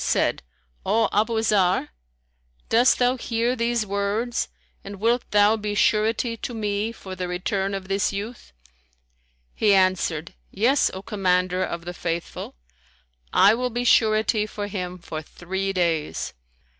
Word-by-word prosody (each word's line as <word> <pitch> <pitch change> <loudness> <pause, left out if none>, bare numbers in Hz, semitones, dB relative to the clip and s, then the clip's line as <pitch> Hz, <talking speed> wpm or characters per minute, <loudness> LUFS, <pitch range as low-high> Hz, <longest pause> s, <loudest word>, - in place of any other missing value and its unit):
said, - - +1 0.4
O 225 0 +2
Abu 220 +2 +2
Zarr, 190 -7 +2 0.8
dost 240 +3 +5
thou 250 +1 +2
hear 235 +1 -1
these 235 -1 0
words 200 +4 -1 0.4
and 200 +1 -7
wilt 235 +3 +1
thou 205 +1 +5
be 210 -1 -3
surety 225 +3 +2
to 240 - -5
me 210 0 -1
for 190 -4 -9
the 180 0 -4
return 190 +2 -2
of 190 -1 -6
this 195 +1 +1
youth?" 210 +4 -6 1.0
He 205 -2 +3
answered, 185 -4 +1 0.2
"Yes, 245 +8 +2
O 190 - -7
Commander 185 -2 +1
of 170 -1 -4
the 175 - -5
Faithful, 170 - -4 0.8
I 205 - +6
will 250 +2 -1
be 240 +1 -2
surety 215 -2 +3
for 205 -1 -5
him 185 -3 -5
for 160 -2 -6
three 190 +5 -4
days." 170 -5 -1
205 Hz, 140 wpm, -24 LUFS, 185-225 Hz, 1.0 s, I